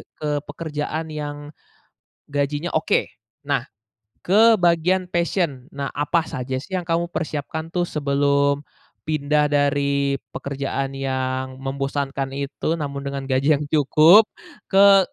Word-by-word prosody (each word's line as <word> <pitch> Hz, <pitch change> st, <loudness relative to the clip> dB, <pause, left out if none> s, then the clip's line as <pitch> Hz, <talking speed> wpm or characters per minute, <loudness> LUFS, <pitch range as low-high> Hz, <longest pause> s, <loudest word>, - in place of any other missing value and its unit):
ke 150 Hz, -, -5 dB, 0.2 s
pekerjaan 155 Hz, 0 st, -4 dB
yang 145 Hz, -1 st, -6 dB, 0.8 s
gajinya 145 Hz, +3 st, -1 dB
oke. 155 Hz, -, +2 dB, 0.4 s
Nah, 145 Hz, -4 st, +1 dB, 0.6 s
ke 220 Hz, +4 st, +6 dB
bagian 180 Hz, +1 st, +2 dB
passion 170 Hz, -6 st, -1 dB
nah 140 Hz, 0 st, -4 dB
apa 155 Hz, +3 st, 0 dB
saja 130 Hz, +1 st, -3 dB
sih 185 Hz, +8 st, -8 dB
yang 185 Hz, -, 0 dB
kamu 170 Hz, 0 st, 0 dB
persiapkan 160 Hz, +1 st, -4 dB
tuh 175 Hz, 0 st, 0 dB
sebelum 140 Hz, -1 st, +1 dB, 0.5 s
pindah 150 Hz, -1 st, +1 dB
dari 140 Hz, -1 st, +1 dB, 0.2 s
pekerjaan 135 Hz, 0 st, -3 dB
yang 130 Hz, -1 st, -2 dB
membosankan 135 Hz, 0 st, -3 dB
itu 140 Hz, +3 st, -2 dB
namun 140 Hz, -3 st, -4 dB
dengan 140 Hz, 0 st, -3 dB
gaji 135 Hz, +3 st, +2 dB
yang 145 Hz, -, -2 dB
cukup 155 Hz, +7 st, +6 dB, 0.4 s
ke 195 Hz, 0 st, +7 dB
145 Hz, 120 wpm, -22 LUFS, 140-165 Hz, 0.8 s, ke